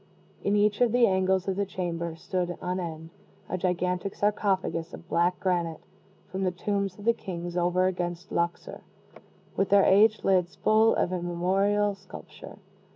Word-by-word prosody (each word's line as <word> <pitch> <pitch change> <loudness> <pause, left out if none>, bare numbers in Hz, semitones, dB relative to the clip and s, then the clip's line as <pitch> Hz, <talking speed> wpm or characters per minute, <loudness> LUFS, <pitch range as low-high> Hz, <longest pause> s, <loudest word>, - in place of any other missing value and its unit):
In 200 - +1
each 210 +1 +2
of 240 -2 +4
the 245 0 +5
angles 190 -1 +1
of 190 - 0
the 200 - 0
chamber 170 -3 -3
stood 175 +1 -3
on 180 +1 -2
end 160 -2 -6 0.4
a - - -3
gigantic 180 +1 -1
sarcophagus 195 -4 -1
of 170 - -15
black 175 +1 +1
granite, 175 -4 -1 0.5
from 190 - -3
the 185 - +2
tombs 195 +1 -2
of 205 - -11
the 235 - +5
kings 175 -5 -6
over 180 +1 +2
against 175 -1 -3
Luxor, 170 0 -2 0.7
with 195 - 0
their 200 -1 +5
aged 215 +3 +4
lids 185 -2 +2
full 220 +1 +3
of 180 - 0
immemorial 190 +4 +1
sculpture. 195 -1 -12
185 Hz, 155 wpm, -27 LUFS, 175-200 Hz, 0.7 s, the